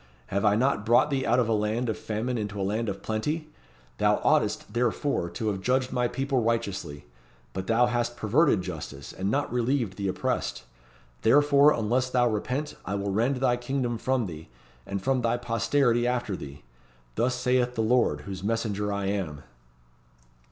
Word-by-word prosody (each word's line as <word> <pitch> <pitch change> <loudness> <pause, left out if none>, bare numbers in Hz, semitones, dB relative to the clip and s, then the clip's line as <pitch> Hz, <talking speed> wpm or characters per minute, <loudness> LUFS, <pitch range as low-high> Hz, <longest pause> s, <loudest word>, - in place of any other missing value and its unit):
"Have 100 +1 +1
I 105 -1 +4
not 125 -2 +1
brought 120 +6 +4
thee 135 -1 0
out 120 +2 +3
of 125 -3 +2
a 115 - +2
land 110 +3 0
of 110 - -1
famine 110 +4 -3
into 105 -3 -3
a - - 0
land 110 +3 -1
of 100 - -6
plenty? 150 +9 -2 0.5
Thou - - +4
oughtest, - - +1
therefore, 120 - 0
to 105 +6 -2
have 95 -2 -3
judged 130 +3 +1
my 125 -1 +1
people 135 0 -1
righteously! 100 -10 -2 0.5
But 95 0 -4
thou 115 +2 +4
hast 120 0 -1
perverted 110 - +3
justice, 75 -6 -7
and 95 +1 -2
not 140 +2 -1
relieved 120 -5 0
the 100 -1 -2
oppressed. 90 -8 -2 0.6
Therefore, 145 +3 +5
unless 125 +2 0
thou 125 -1 +3
repent, 125 +7 -2
I 100 - -3
will 100 0 -2
rend 115 +7 +1
thy 125 -1 +1
kingdom 120 -2 -2
from 130 -2 0
thee, 80 -6 -8 0.4
and 100 -1 -4
from 135 -1 +1
thy 115 0 +1
posterity 120 +1 +1
after 120 -5 -1
thee! 70 -3 -9 0.5
Thus 125 - +1
saith 125 0 +1
the 110 - 0
Lord, 110 -10 +2
whose 95 +2 -7
messenger 105 -2 -1
I 100 -1 -2
am." 90 -7 -3
115 Hz, 175 wpm, -27 LUFS, 100-125 Hz, 0.6 s, Therefore